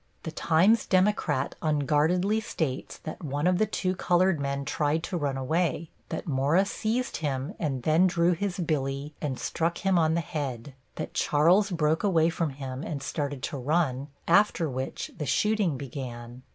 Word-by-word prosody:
The 160 - -4
Times 175 +8 +3
Democrat 185 -8 +2
unguardedly 155 +7 +2
states 155 -10 -3
that 155 - -7
one 145 +1 -2
of 180 0 +3
the 215 - +3
two 185 -2 -1
colored 180 -2 +2
men 140 0 -2
tried 150 +3 0
to - - -4
run 145 -5 -1
away; 160 +4 -1 0.2
that - - -4
Mora 150 +6 +2
seized 225 +5 -2
him 140 +1 -2
and 135 -6 -2
then 160 +6 +4
drew 170 0 +2
his 180 +1 -2
billy 145 -4 -2
and 140 -4 -2
struck 170 +1 -1
him 190 -2 +4
on 160 0 +2
the 170 - +1
head; 140 -5 -5 0.2
that - - -5
Charles 175 +8 +3
broke 160 -2 +1
away 165 -5 +3
from 165 -1 -1
him 135 -1 -6
and 145 -3 -5
started 145 -2 -3
to 145 - -3
run, 140 -1 0 0.2
after 175 -2 +4
which 130 -1 -4
the 150 - -3
shooting 210 -7 +1
began. 125 -2 -7
155 Hz, 165 wpm, -27 LUFS, 140-180 Hz, 0.2 s, then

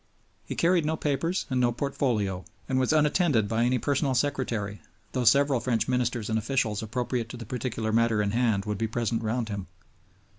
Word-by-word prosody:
He - - -4
carried 170 0 +3
no 160 +1 -1
papers 155 +6 -1
and 130 -1 +2
no 120 -1 +3
portfolio, 115 -8 -1 0.2
and 130 -1 +1
was 130 - +2
unattended 150 - +3
by 115 +2 +1
any 125 +1 +2
personal 135 +1 0
secretary, 120 -6 -1 0.3
though 125 -2 -1
several 140 0 +4
French 115 -3 0
ministers 125 -3 0
and 110 0 +1
officials 110 -2 0
appropriate 120 +1 -2
to 125 - -7
the 115 - -8
particular 115 -1 -3
matter 115 -1 +2
in 100 -1 +1
hand 110 -4 +1
would 105 -2 -3
be 115 - 0
present 115 0 -1
round 115 +1 -1
him. 100 -2 -5
120 Hz, 185 wpm, -27 LUFS, 110-135 Hz, 0.3 s, several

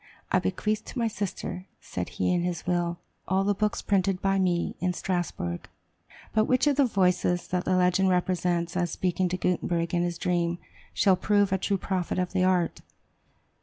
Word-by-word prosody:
"I - - +4
bequeath 215 - -1
to - - -8
my 230 -1 +1
sister," 190 -3 -4
said - - -5
he - - +2
in 175 - +1
his 175 -1 -3
will, 175 -1 0 0.3
"all 190 +1 +2
the 205 +1 +2
books 210 +1 -1
printed 195 -2 +1
by 195 0 +1
me 175 -2 0
in 180 0 0
Strasbourg." 175 - -3 0.6
But 215 0 +3
which 255 +3 +2
of 290 -2 +2
the 280 - +5
voices 180 -4 +1
that 180 -1 -1
the 185 - +2
legend 185 +1 +3
represents 180 -1 0
as 175 -1 +1
speaking 180 +1 0
to 180 - -2
Gutenberg 175 -1 0
in 175 - +2
his 175 -1 -1
dream, 175 -1 0 0.3
shall 195 -3 +4
prove 205 +1 +2
a 190 - +1
true 200 +1 0
prophet 185 -2 -2
of 180 0 -1
the 185 -1 +2
art? 180 -2 +1
180 Hz, 185 wpm, -27 LUFS, 175-195 Hz, 0.6 s, the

